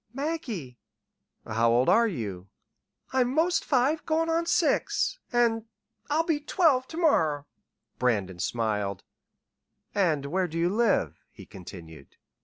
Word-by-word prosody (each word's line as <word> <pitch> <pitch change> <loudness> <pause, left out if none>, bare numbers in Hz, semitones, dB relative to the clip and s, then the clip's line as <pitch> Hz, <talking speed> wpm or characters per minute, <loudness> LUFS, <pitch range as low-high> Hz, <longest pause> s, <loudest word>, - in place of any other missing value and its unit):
"Maggie." 245 - -4 0.7
"How 115 +1 +1
old 120 +2 +3
are 230 0 +5
you?" 100 - -5 0.7
"I'm 255 -1 +2
'most 335 +2 +2
five 285 +3 +1
goin' 325 +1 0
on 335 +1 0
six - - +1
an' 230 -2 +1 0.4
I'll 310 +3 +2
be 320 -3 0
twelve 295 -4 +2
ter 325 - -9
morrer." 160 - +2 0.5
Brandon 100 -8 0
smiled. 105 -3 -2 0.9
"And 165 -8 +1
where 180 +5 0
do 165 0 -6
you 170 +1 +2
live?" 200 - +1
he - - -13
continued. 85 -6 -12
190 Hz, 125 wpm, -27 LUFS, -, 0.9 s, are